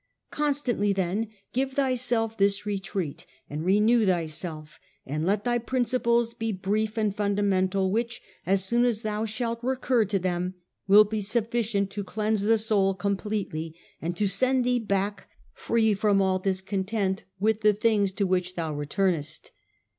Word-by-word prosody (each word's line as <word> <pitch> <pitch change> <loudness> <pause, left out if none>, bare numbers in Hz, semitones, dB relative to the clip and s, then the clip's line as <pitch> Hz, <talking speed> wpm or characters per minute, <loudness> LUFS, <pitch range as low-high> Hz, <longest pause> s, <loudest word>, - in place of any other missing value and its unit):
Constantly 275 -8 0
then 195 +3 -1 0.3
give 265 +1 -1
thyself 245 -4 +1
this 200 0 +1
retreat, 195 -6 -4 0.2
and 150 +2 -5
renew 210 +5 +4
thyself; 165 -3 -2 0.3
and 155 +5 -2
let 200 +1 +1
thy 240 -1 +1
principles 235 -1 +1
be 225 -1 -3
brief 210 +3 -1
and 210 -3 0
fundamental, 195 -2 +1
which, 235 +3 -1 0.2
as 190 +1 +1
soon 235 +4 +2
as 235 -3 +1
thou 215 0 -1
shalt 230 +2 -3
recur 255 -1 +1
to 200 -1 0
them, 180 0 -2 0.3
will 205 +2 +8
be 210 0 -3
sufficient 220 -1 -1
to 205 0 -4
cleanse 215 +1 -1
the 225 +2 +3
soul 205 -3 +2
completely, 195 -5 -3 0.3
and 170 +2 -3
to 210 - +1
send 255 +6 +2
thee 245 0 +2
back 205 -1 -2 0.2
free 225 -2 +1
from 200 0 +2
all 190 -1 +2
discontent 190 +1 -1 0.2
with 220 +2 +1
the 210 0 +5
things 210 -2 +1
to 200 +1 -1
which 185 -1 0
thou 160 -3 -3
returnest. 155 +1 -2
205 Hz, 150 wpm, -26 LUFS, 190-225 Hz, 0.3 s, will